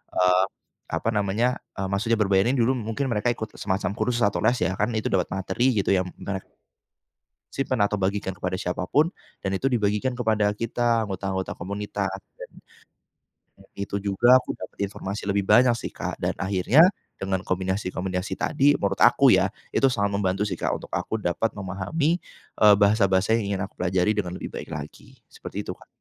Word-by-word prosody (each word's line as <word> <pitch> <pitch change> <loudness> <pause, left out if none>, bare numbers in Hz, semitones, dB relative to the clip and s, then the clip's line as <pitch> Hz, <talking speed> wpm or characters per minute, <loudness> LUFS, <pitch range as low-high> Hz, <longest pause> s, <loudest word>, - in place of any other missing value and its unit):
eee, 90 +1 +4 0.4
apa 115 - -1
namanya, 105 +4 0 0.2
eee, 95 -1 -2
maksudnya 115 +4 +1
berbayar 100 0 +3
ini 130 - +2
dulu, 120 +1 +3
mungkin 120 +3 -2
mereka 110 +1 0
ikut 110 -1 -7
semacam 95 -1 -1
kursus 120 +2 -1
atau 100 - +2
les 125 - +3
ya, 95 - +1
kan - - +2
itu 110 - -1
dapat 90 -3 +1
materi 115 +6 0
gitu 100 -2 +1
yang 95 -1 +2
mere 95 -1 -4 1.1
simpan 130 -5 0
atau 100 +1 +1
bagikan 95 0 -1
kepada 95 0 -3
siapa 90 -1 -3
pun 155 - +3 0.3
dan 95 - -1
itu 95 +8 0
dibagikan 115 +1 0
kepada 110 -4 +1
kita 115 0 0
anggota-anggota 95 -1 -3
komunitas. 100 +2 -3 0.3
Dan - - -9 1.1
dan - - -18
itu 100 0 -3
juga 120 +6 +5
aku - - -5
dapat - - -10
informasi 100 +1 -6
lebih 100 0 +1
banyak 120 +4 +6
sih, - - -5
Kak. - - -4
Dan - - 0
akhirnya, 100 - +4 0.3
dengan 95 -1 -2
kombinasi-kombinasi 95 0 -2
tadi 145 0 +3
menurut 100 - -2
aku - - +6
ya - - +4 0.2
itu 135 - +4
sangat 100 -5 0
membantu 100 0 0
sih, 105 - -3
Kak, - - 0
untuk - - -12
aku 110 - -2
dapat 105 +2 -1
memahami, 100 - -1 0.4
eee, 105 -1 +8
bahasa-bahasa 100 -1 +3
yang 100 -2 -2
ingin 95 - -3
aku 100 - -10
pelajari 90 +3 +2
dengan 95 -4 -3
lebih - - -7
baik - - -7
lagi, 75 0 -9 0.2
seperti - - -6
itu, - - -4
Kak. - - -16
100 Hz, 180 wpm, -25 LUFS, 95-115 Hz, 1.1 s, eee